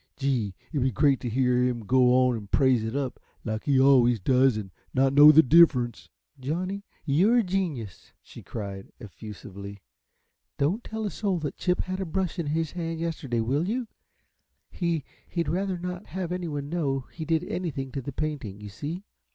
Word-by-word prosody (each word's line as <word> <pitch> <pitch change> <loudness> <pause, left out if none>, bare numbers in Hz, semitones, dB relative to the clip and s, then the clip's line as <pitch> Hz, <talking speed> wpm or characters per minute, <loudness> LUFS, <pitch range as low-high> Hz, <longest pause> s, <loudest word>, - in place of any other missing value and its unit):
Gee, 125 -9 -1 0.2
it'd 145 - 0
be 130 +1 +2
great 140 +2 +3
t' 125 - -4
hear 125 +1 +2
'im 120 -3 -1
go 130 +3 +4
on 125 -1 +4
an' 105 -3 -7
praise 130 +1 +3
it 110 +3 -4
up, 135 -3 -3 0.3
like 110 -1 -3
he 140 -2 +3
always 125 -4 +5
does, 130 +3 +3
an' 100 -3 -6 0.2
not 135 +1 +3
know 145 +2 +9
the 160 +1 +7
diffrunce." 130 -6 +4 0.3
"Johnny, 185 +9 -3 0.2
you're 180 - +4
a 235 - +4
genius," 170 - -3 0.3
cried 100 -3 -6
she, - - -13
effusively. 100 -1 -10 0.7
"Don't 175 +12 0
tell 220 0 -4
a 205 - -2
soul 195 -4 -1
that 150 - -4
Chip 180 0 0
had 185 0 -4
a 190 - -2
brush 185 +2 -2
in 165 - -2
his 160 +1 -1
hand 165 -2 -4
yesterday, 150 -8 -2
will 140 - 0
you? 245 +1 -2 0.8
He 170 -4 -1 0.2
he'd 170 -3 -2
rather 185 +4 -1
not 180 +2 -6
have 180 -1 -4
anyone 160 -6 -3
know 145 -5 -1
he 160 - -6
did 160 +1 0
anything 150 -8 -4
to 135 - -4
the 140 - -6
painting, 135 -9 -4
you 105 0 -8
see." 150 - -6
140 Hz, 185 wpm, -26 LUFS, 125-170 Hz, 0.8 s, know